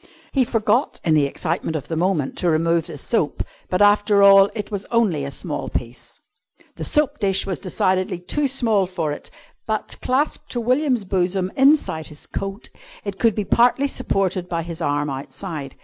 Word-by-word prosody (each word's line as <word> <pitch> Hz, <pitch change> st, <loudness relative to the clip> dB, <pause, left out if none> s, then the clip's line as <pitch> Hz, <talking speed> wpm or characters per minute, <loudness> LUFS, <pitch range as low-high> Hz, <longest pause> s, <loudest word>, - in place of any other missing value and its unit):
He 270 Hz, -, +3 dB
forgot, 235 Hz, +3 st, +1 dB
in 160 Hz, -, +2 dB
the 150 Hz, -2 st, +4 dB
excitement 165 Hz, +3 st, -3 dB
of 145 Hz, -2 st, -4 dB
the 165 Hz, -, -3 dB
moment, 165 Hz, -4 st, 0 dB
to 175 Hz, -, +1 dB
remove 165 Hz, +1 st, +1 dB
the -, -, -8 dB
soap, -, -, -1 dB, 0.3 s
but, 185 Hz, +3 st, +3 dB
after 205 Hz, 0 st, +4 dB
all, 195 Hz, 0 st, +8 dB
it 210 Hz, -1 st, -5 dB
was 200 Hz, -1 st, -3 dB
only 210 Hz, -11 st, +1 dB
a 140 Hz, -, -3 dB
small 145 Hz, +2 st, -4 dB
piece. 120 Hz, 0 st, -6 dB, 0.6 s
The -, -, -5 dB
soap 300 Hz, -3 st, +1 dB
dish 195 Hz, -2 st, +1 dB
was 190 Hz, -3 st, -3 dB
decidedly 185 Hz, 0 st, 0 dB
too 280 Hz, +12 st, -1 dB
small 225 Hz, -7 st, +2 dB
for 170 Hz, -5 st, -2 dB
it, -, -, -7 dB, 0.4 s
but, 215 Hz, -1 st, -2 dB
clasped 270 Hz, +4 st, -1 dB
to 245 Hz, -, -1 dB
William's 250 Hz, -1 st, +1 dB
bosom 185 Hz, 0 st, 0 dB
inside 270 Hz, -, +3 dB
his 150 Hz, +1 st, -10 dB
coat, 195 Hz, +1 st, -6 dB, 0.3 s
it 200 Hz, -1 st, -5 dB
could 230 Hz, -3 st, +3 dB
be 210 Hz, -, -2 dB
partly 250 Hz, +6 st, +3 dB
supported 195 Hz, -8 st, -1 dB
by 170 Hz, -1 st, -2 dB
his 170 Hz, 0 st, -7 dB
arm 145 Hz, -1 st, 0 dB
outside. 140 Hz, +1 st, -6 dB
190 Hz, 180 wpm, -22 LUFS, 165-220 Hz, 0.6 s, all